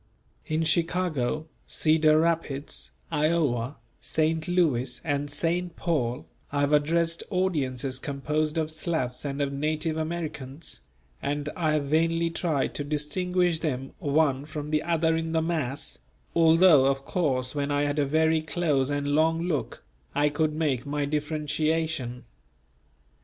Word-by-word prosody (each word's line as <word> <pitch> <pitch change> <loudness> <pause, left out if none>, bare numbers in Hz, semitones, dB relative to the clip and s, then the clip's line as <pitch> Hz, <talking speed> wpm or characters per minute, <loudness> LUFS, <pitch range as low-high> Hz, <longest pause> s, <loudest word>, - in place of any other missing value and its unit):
In 155 +1 0
Chicago, 160 -4 0 0.2
Cedar 155 -1 +4
Rapids, 160 -4 -1 0.2
Iowa, 150 -5 +1 0.2
St. 160 0 0
Louis 135 -9 +1
and 145 -2 -1
St. 170 +3 -1
Paul 125 -8 -1 0.3
I 145 0 0
have 145 +1 +2
addressed 165 +3 +2
audiences 140 - 0
composed 150 +3 -1
of 160 -1 0
Slavs 155 -6 -2
and 140 0 -3
of 140 0 -2
native 155 +2 -1
Americans; 155 - -4 0.4
and 145 +1 -2
I 160 -4 +1
have 150 -1 +1
vainly 165 +3 +2
tried 160 -5 -1
to 145 - -3
distinguish 170 +4 0
them 135 -5 -3
one 145 -2 +2
from 150 -1 -6
the 155 -1 +2
other 165 -1 +1
in 165 0 -2
the 160 - +2
mass, 155 -4 -3 0.4
although 165 -3 +6
of 135 0 0
course 130 -7 0
when 145 -1 -1
I 145 0 +1
had 145 +1 0
a 145 - +3
very 160 +2 +3
close 150 -4 0
and 145 0 -1
long 160 +3 +2
look, 165 -6 -2 0.3
I 145 +1 +3
could 150 +1 0
make 145 -6 0
my 145 0 -1
differentiation. 150 -3 -1
155 Hz, 135 wpm, -27 LUFS, 140-165 Hz, 0.4 s, although